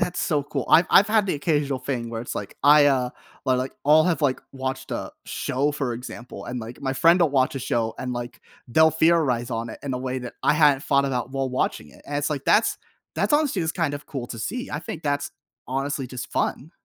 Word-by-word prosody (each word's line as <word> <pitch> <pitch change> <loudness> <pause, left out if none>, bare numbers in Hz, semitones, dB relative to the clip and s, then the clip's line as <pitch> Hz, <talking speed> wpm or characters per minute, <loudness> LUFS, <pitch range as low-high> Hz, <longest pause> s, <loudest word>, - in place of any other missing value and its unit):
that's 180 0 -1
so 150 -3 +1
cool. 140 -2 -4
I've 170 - +6
I've 200 - +7
had 215 -2 +2
the 185 - 0
occasional 145 -2 0
thing 125 -2 -3
where 115 -1 -4
it's 120 - -6
like, 100 - -6
I, 145 0 +7
uh, 130 -3 +2 0.3
or, 130 - +2
like, 130 +1 -2
all 155 +2 +6
have, 170 -3 0
like, 135 -3 +1
watched 130 0 -4
a - - -4
show, 140 +3 -1
for 135 -4 -2
example, 125 +1 -8
and, 125 0 -4
like, 115 +2 -9
my 135 -1 -1
friend 170 +6 +5
will 165 -4 +4
watch 130 -1 +2
a - - -2
show 115 -3 -1
and, 125 -1 -3
like, 120 0 -6 0.3
they'll 160 +6 +5
theorize 155 -7 +2
on 115 0 -3
it - - -9
in 140 - -3
a - - -2
way 130 0 -3
that 125 -1 -8
I - - +4
hadn't 145 -3 +4
thought 140 -1 +2
about 125 -2 -2
while 135 -1 -1
watching 125 - -2
it. - - -18
And 145 - -3
it's 145 +1 -1
like, 140 -2 -3
that's 220 - +3 0.4
that's, - - 0
honestly, 295 - +2
just 160 0 -2
kind 165 -6 0
of 145 - -8
cool 130 -5 -5
to 115 - -7
see. 245 - -4
I 150 - -3
think 160 0 -7
that's, 145 -1 -1 0.4
honestly, 135 +1 -2
just 125 0 -7
fun. 150 - -1
140 Hz, 240 wpm, -24 LUFS, 125-155 Hz, 0.4 s, I've